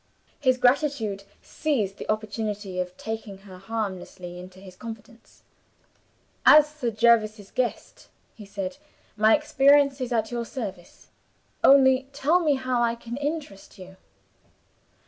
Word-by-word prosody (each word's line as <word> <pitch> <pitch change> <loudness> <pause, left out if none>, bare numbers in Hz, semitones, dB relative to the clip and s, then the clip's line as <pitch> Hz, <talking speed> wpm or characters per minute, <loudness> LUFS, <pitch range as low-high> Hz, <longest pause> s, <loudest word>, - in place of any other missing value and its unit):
His 255 -3 +2
gratitude 245 -6 +1 0.2
seized 225 -11 -2
the - - -8
opportunity 210 -3 -4
of 180 0 -4
taking 220 -3 -6
her 185 -2 -12
harmlessly 190 -4 -5
into 185 +1 -12
his 190 -1 -13
confidence. 225 +2 -12 1.0
"As 300 0 +8
Sir 300 -5 -4
Jervis's 215 -2 +2
guest," 250 -2 -4 0.3
he 220 - -12
said, 195 +4 -5 0.4
"my 215 +1 +5
experience 285 -2 +3
is 250 -1 -3
at 225 -1 0
your 240 -1 -2
service. 200 -8 -8 0.5
Only 265 -1 +5
tell 295 +6 +2
me 305 -5 +2
how 255 -2 -1
I 235 0 +1
can 235 0 -8
interest 285 -10 -5
you." 190 0 -12
230 Hz, 125 wpm, -25 LUFS, 200-265 Hz, 1.0 s, As